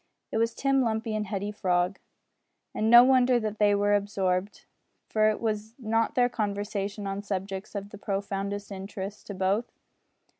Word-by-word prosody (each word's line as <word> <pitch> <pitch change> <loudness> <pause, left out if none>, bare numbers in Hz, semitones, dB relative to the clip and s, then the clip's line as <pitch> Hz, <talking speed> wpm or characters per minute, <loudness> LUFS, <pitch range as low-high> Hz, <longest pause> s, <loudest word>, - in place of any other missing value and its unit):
It 220 - 0
was 230 0 +1
Tim 275 -1 +2
Lumpy 225 -1 -1
and 215 -1 -2
Hetty 200 +1 -3
Frog. 180 -2 0 0.7
And 220 - 0
no 240 +1 +10
wonder 255 -1 +4
that 215 -1 -4
they 205 -1 +4
were 205 0 +2
absorbed, 195 -1 -1 0.4
for 215 -1 +2
was 220 0 -3
not 225 -2 0
their 245 -1 +4
conversation 205 -2 -3
on 195 0 -3
subjects 195 0 -5
of 200 0 -5
the 205 - -10
profoundest 200 0 -3
interest 195 +1 -7
to 200 - -6
both? 195 +5 0
205 Hz, 155 wpm, -27 LUFS, 195-220 Hz, 0.7 s, no